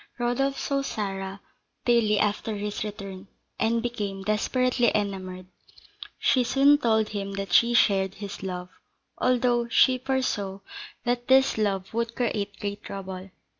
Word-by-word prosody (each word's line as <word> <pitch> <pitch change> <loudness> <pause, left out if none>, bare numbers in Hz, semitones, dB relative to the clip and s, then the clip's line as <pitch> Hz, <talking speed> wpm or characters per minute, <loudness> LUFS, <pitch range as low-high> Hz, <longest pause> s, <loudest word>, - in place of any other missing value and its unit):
Rodolph 250 +3 0
saw 275 -1 -1
Sarah 195 -5 -4 0.4
daily 230 -3 +3
after 210 +1 0
his 205 0 -3
return, 200 -2 -7 0.3
and 230 +1 +1
became 205 -5 -3
desperately 240 +3 +2
enamoured. 185 -3 -3 0.7
She 255 - +3
soon 275 +4 +5
told 220 -4 +2
him 200 -1 -4
that 195 -2 -4
she 235 +1 +5
shared 195 -4 +3
his 200 -1 -7
love, 180 -1 -5 0.5
although 245 -1 +2
she 255 +2 +4
foresaw 245 -7 -1 0.4
that 245 0 -1
this 265 +1 +5
love 195 -3 -1
would 230 0 -2
create 205 -5 -2
great 205 0 -4
trouble. 190 -1 -7
210 Hz, 130 wpm, -26 LUFS, 195-240 Hz, 0.7 s, soon